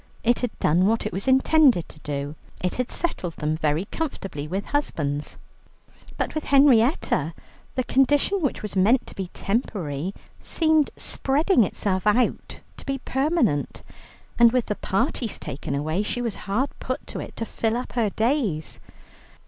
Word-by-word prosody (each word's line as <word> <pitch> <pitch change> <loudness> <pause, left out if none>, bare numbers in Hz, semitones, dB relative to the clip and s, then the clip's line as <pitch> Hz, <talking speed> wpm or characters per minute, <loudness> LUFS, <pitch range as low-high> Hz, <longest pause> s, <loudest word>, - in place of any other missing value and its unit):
It 240 +1 +3
had 245 -3 -3
done 175 +5 +3
what 225 0 +1
it 215 - -3
was 195 +5 -3
intended 265 - +4
to 150 - -15
do, 145 -1 -4 0.3
it 180 - -1
had 250 0 -2
settled 185 - -2
them 155 0 -1
very 155 +3 0
comfortably 195 - -4
with 190 +5 -3
husbands. 150 - -2 0.8
But - - -2
with 310 - -3
Henrietta, 255 - +3 0.4
the 255 - +1
condition 290 +10 +2
which 280 -7 -1
was 210 - -4
meant 215 +7 +4
to - - -9
be 190 -2 -4
temporary, 190 - -2 0.2
seemed 315 -3 +2
spreading 280 - +2
itself 190 0 -1
out 235 +4 +1 0.2
to - - -10
be 275 0 0
permanent, 265 - 0 0.6
and 235 -1 +7
with 250 -1 +1
the 210 - -2
parties 230 +3 -1
taken 140 +1 -5
away, 155 +6 -1
she 215 +3 -2
was 230 -4 -2
hard 255 +8 +1
put 255 +2 -4
to - - -6
it - - -7
to 225 - -3
fill 225 +1 -1
up 250 - -5
her 230 -4 +1
days. 220 - -1
225 Hz, 160 wpm, -24 LUFS, 175-265 Hz, 0.8 s, and